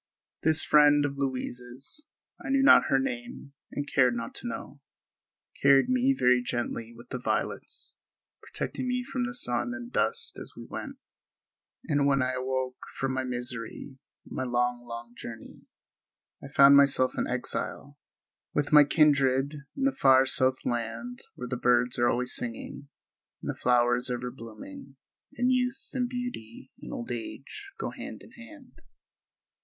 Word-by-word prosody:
This 160 Hz, -1 st, +2 dB
friend 145 Hz, -1 st, +5 dB
of 140 Hz, -1 st, -4 dB
Louise's, 130 Hz, -, -5 dB, 0.4 s
I -, -, -5 dB
knew 270 Hz, 0 st, +3 dB
not 280 Hz, -, +8 dB
her -, -, +4 dB
name 250 Hz, -, -4 dB, 0.2 s
and 145 Hz, 0 st, -4 dB
cared 125 Hz, -3 st, +3 dB
not 115 Hz, 0 st, -5 dB
to -, -, -4 dB
know, 120 Hz, +4 st, -7 dB, 0.8 s
carried 140 Hz, -, +5 dB
me 255 Hz, +1 st, +3 dB
very 125 Hz, 0 st, +4 dB
gently 120 Hz, -1 st, -3 dB
with 120 Hz, +1 st, -15 dB
the 125 Hz, -, -4 dB
violets, -, -, -3 dB, 0.5 s
protecting 255 Hz, -, -4 dB
me 250 Hz, 0 st, 0 dB
from 250 Hz, 0 st, -2 dB
the 245 Hz, -, -4 dB
sun 245 Hz, 0 st, -1 dB
and 245 Hz, -1 st, -8 dB
dust 460 Hz, 0 st, -1 dB
as -, -, -10 dB
we -, -, -8 dB
went; -, -, -6 dB, 0.9 s
and 145 Hz, -3 st, +2 dB
when 135 Hz, -2 st, +3 dB
I 130 Hz, -, 0 dB
awoke 130 Hz, 0 st, -2 dB, 0.2 s
from 135 Hz, 0 st, -1 dB
my 130 Hz, 0 st, -1 dB
misery 125 Hz, +1 st, -6 dB, 0.3 s
and -, -, -10 dB
my -, -, -2 dB
long, 120 Hz, -1 st, -1 dB
long 115 Hz, 0 st, -8 dB
journey, 115 Hz, -1 st, -10 dB, 0.8 s
I -, -, -6 dB
found 140 Hz, 0 st, +7 dB
myself 140 Hz, -2 st, +4 dB
an -, -, -1 dB
exile, -, -, -4 dB, 0.6 s
with 145 Hz, 0 st, 0 dB
my 150 Hz, -1 st, +10 dB
kindred, 140 Hz, -2 st, +3 dB, 0.2 s
in 270 Hz, -, -1 dB
the 275 Hz, -, +4 dB
far 135 Hz, -, +5 dB
south 130 Hz, 0 st, 0 dB
land 120 Hz, +1 st, -3 dB, 0.2 s
where 125 Hz, -, -6 dB
the 125 Hz, 0 st, -3 dB
birds 125 Hz, 0 st, +2 dB
are 120 Hz, 0 st, +4 dB
always 125 Hz, +1 st, -1 dB
singing, 125 Hz, +4 st, -6 dB, 0.5 s
and -, -, -1 dB
the -, -, -11 dB
flowers 120 Hz, +1 st, +2 dB
are 125 Hz, -, 0 dB
ever 125 Hz, 0 st, -5 dB
blooming, 115 Hz, +2 st, -11 dB, 0.4 s
and 250 Hz, +1 st, +2 dB
youth 250 Hz, +1 st, -1 dB
and 250 Hz, -2 st, -1 dB
beauty 245 Hz, -, -6 dB
and -, -, -8 dB
old 120 Hz, -, -5 dB
age 140 Hz, -, -7 dB
go -, -, -3 dB
hand -, -, -8 dB
in -, -, -15 dB
hand. 265 Hz, +4 st, -15 dB
130 Hz, 160 wpm, -28 LUFS, 125-160 Hz, 0.9 s, my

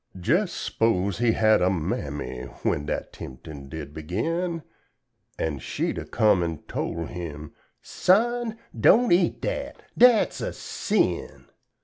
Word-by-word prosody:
Jes 170 Hz, -, +2 dB
s'pose 100 Hz, -, 0 dB
he'd 120 Hz, -2 st, +3 dB
had 110 Hz, -2 st, +4 dB
a 90 Hz, -, +4 dB
Mammy 75 Hz, -7 st, -3 dB, 0.2 s
when 75 Hz, +1 st, 0 dB
dat -, -, -3 dB
temptin' 70 Hz, +1 st, -9 dB
did 75 Hz, -2 st, -7 dB
begin 165 Hz, -, -2 dB, 0.7 s
An' 75 Hz, -4 st, -2 dB
she'd -, -, -2 dB
a -, -, -6 dB
come 105 Hz, -4 st, +3 dB
an' 85 Hz, -3 st, -3 dB
tole 85 Hz, 0 st, -3 dB
him 80 Hz, -3 st, -7 dB, 0.3 s
"Son, 230 Hz, +4 st, +2 dB, 0.2 s
don' 245 Hz, +1 st, +5 dB
eat 175 Hz, 0 st, +3 dB
dat -, -, -3 dB, 0.2 s
dat's 245 Hz, -2 st, +5 dB
a -, -, -3 dB
sin." -, -, -1 dB
95 Hz, 125 wpm, -25 LUFS, -, 0.7 s, don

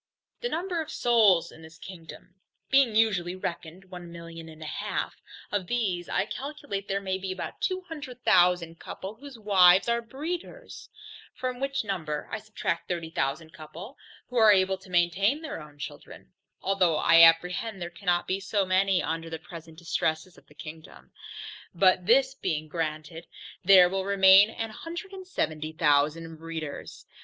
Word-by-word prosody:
The 485 Hz, -, -3 dB
number 345 Hz, -1 st, -2 dB
of 315 Hz, -, -7 dB
souls 215 Hz, -8 st, +3 dB
in 160 Hz, -, -15 dB
this 160 Hz, +1 st, -14 dB
kingdom 175 Hz, -1 st, -12 dB, 0.4 s
being 270 Hz, -5 st, +4 dB
usually 195 Hz, -5 st, +2 dB
reckoned 175 Hz, 0 st, -6 dB
one 175 Hz, -1 st, -9 dB
million 165 Hz, -1 st, -10 dB
and 155 Hz, 0 st, -11 dB
a -, -, -7 dB
half, 150 Hz, -, -4 dB, 0.3 s
of 200 Hz, -3 st, -2 dB
these 190 Hz, -7 st, -1 dB
I -, -, 0 dB
calculate 270 Hz, -6 st, -6 dB
there 195 Hz, 0 st, -1 dB
may 190 Hz, -1 st, -3 dB
be 190 Hz, 0 st, -4 dB
about 185 Hz, -, -6 dB
two 370 Hz, -1 st, -1 dB
hundred 290 Hz, -8 st, -9 dB
thousand 175 Hz, -2 st, +3 dB
couple, 195 Hz, +2 st, -7 dB
whose 270 Hz, +2 st, -12 dB
wives 190 Hz, -3 st, +5 dB
are 235 Hz, 0 st, +1 dB
breeders; 335 Hz, -, -7 dB, 0.5 s
from 255 Hz, -1 st, -4 dB
which 275 Hz, -1 st, -1 dB
number 160 Hz, -7 st, -4 dB
I 220 Hz, -, -3 dB
subtract 215 Hz, -5 st, -4 dB
thirty 170 Hz, -2 st, -4 dB
thousand 160 Hz, +2 st, -2 dB
couple, 170 Hz, -, -10 dB, 0.3 s
who 250 Hz, -, -4 dB
are 220 Hz, -2 st, +7 dB
able 190 Hz, -1 st, +2 dB
to 190 Hz, -, -17 dB
maintain 185 Hz, -, +1 dB
their 290 Hz, -, -6 dB
own 150 Hz, -1 st, -14 dB
children, 65 Hz, -, -10 dB, 0.3 s
(although 190 Hz, -4 st, +2 dB
I 165 Hz, +2 st, +6 dB
apprehend 180 Hz, +6 st, +4 dB
there 175 Hz, -1 st, -5 dB
cannot 175 Hz, -1 st, 0 dB
be 190 Hz, +1 st, -1 dB
so 195 Hz, 0 st, 0 dB
many 185 Hz, 0 st, +2 dB
under 165 Hz, 0 st, -3 dB
the 165 Hz, -, -5 dB
present 160 Hz, 0 st, -12 dB
distresses 160 Hz, +1 st, -2 dB
of -, -, -20 dB
the 150 Hz, -, -20 dB
kingdom) 160 Hz, +1 st, -11 dB, 0.6 s
but 185 Hz, 0 st, +3 dB
this 265 Hz, +3 st, +4 dB
being 155 Hz, -, -3 dB
granted, 160 Hz, +1 st, -5 dB, 0.4 s
there 185 Hz, -1 st, +8 dB
will 190 Hz, +1 st, -2 dB
remain 195 Hz, +1 st, +7 dB
a 225 Hz, 0 st, -5 dB
hundred 345 Hz, -, -8 dB
and 380 Hz, -1 st, -10 dB
seventy 155 Hz, -, -3 dB
thousand 155 Hz, +1 st, +1 dB
breeders. 160 Hz, -2 st, -7 dB
185 Hz, 165 wpm, -27 LUFS, 165-220 Hz, 0.6 s, there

